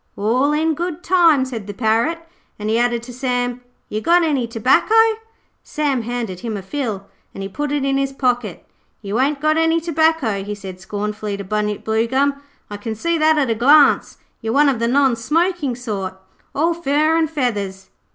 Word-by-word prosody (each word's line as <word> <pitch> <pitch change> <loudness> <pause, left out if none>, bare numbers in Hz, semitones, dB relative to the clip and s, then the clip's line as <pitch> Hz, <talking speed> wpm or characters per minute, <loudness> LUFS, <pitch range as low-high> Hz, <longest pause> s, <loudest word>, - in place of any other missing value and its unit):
'All 245 +8 +1
in 315 +2 +1
good 345 +1 -4
time,' 335 -7 +4
said 230 -6 -6
the 205 - -7
Parrot, 230 +9 +1 0.4
and 210 +1 -3
he 225 - +2
added 240 -1 0
to 245 +1 -9
Sam, 245 -1 -2 0.3
'You 215 - -4
got 345 +8 +4
any 280 -7 0
tobacco?' 235 - +2 0.7
Sam 290 -5 -1
handed 230 -5 -4
him 220 0 -4
a 195 - -7
fill, 215 -4 -4 0.3
and 195 - -6
he - - -3
put 290 +9 -4
it 290 -2 0
in 275 0 +1
his 275 0 -1
pocket. 245 -7 -2 0.4
'You 205 +4 -2
ain't 280 +2 +1
got 310 +2 +2
any 325 0 +2
tobacco,' 315 -10 +1
he 205 +1 -5
said 190 -2 -9
scornfully 210 +1 -4
to 200 - -6
Bunyip 210 +1 -2
Bluegum. 260 +6 +1 0.3
'I 205 - -5
can 220 +2 -5
see 335 +8 -1
that 310 0 +4
at 270 -5 +1
a - - +3
glance. 280 +6 +4 0.2
You're 225 -1 -2
one 290 +2 +5
of 255 -4 -1
the 235 - +1
non 265 0 +3
smoking 305 +2 0
sort, 200 -6 -5 0.4
all 330 +4 +2
fur 310 0 +1
and 325 -2 +1
feathers.' 205 -10 -3
250 Hz, 190 wpm, -19 LUFS, 215-300 Hz, 0.7 s, one